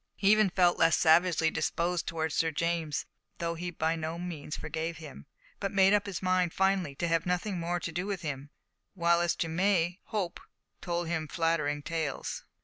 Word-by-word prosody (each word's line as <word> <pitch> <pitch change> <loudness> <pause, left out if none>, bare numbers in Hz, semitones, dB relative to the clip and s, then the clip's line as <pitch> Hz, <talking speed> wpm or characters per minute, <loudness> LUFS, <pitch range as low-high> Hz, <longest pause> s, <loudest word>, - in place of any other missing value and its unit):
He 200 0 +3
even 215 -2 +5
felt 175 -1 +3
less 165 -1 +5
savagely 165 0 +4
disposed 175 0 -1
towards 160 -2 -2
Sir 165 - +2
James, 160 -1 -1 0.3
though 170 0 -2
he 175 +2 -4
by 160 -1 0
no 160 +1 -4
means 170 -4 -5
forgave 160 +1 -4
him, 150 - -11 0.3
but 195 - -2
made 195 0 +5
up 205 0 +2
his 190 -2 -5
mind 185 -2 +2
finally 190 -6 +1
to 170 - -1
have 165 +1 +1
nothing 180 +1 -1
more 175 +1 -1
to 165 - -4
do 180 +4 -3
with 195 -4 -3
him, 145 -2 -4 0.5
while 170 -1 +3
as 175 - +1
to 165 - -1
May 180 +1 +1
hope 195 -5 -3 0.4
told 175 -1 -2
him 160 -2 -2
flattering 150 -3 0
tales. 160 -4 -3
170 Hz, 185 wpm, -30 LUFS, 160-180 Hz, 0.5 s, even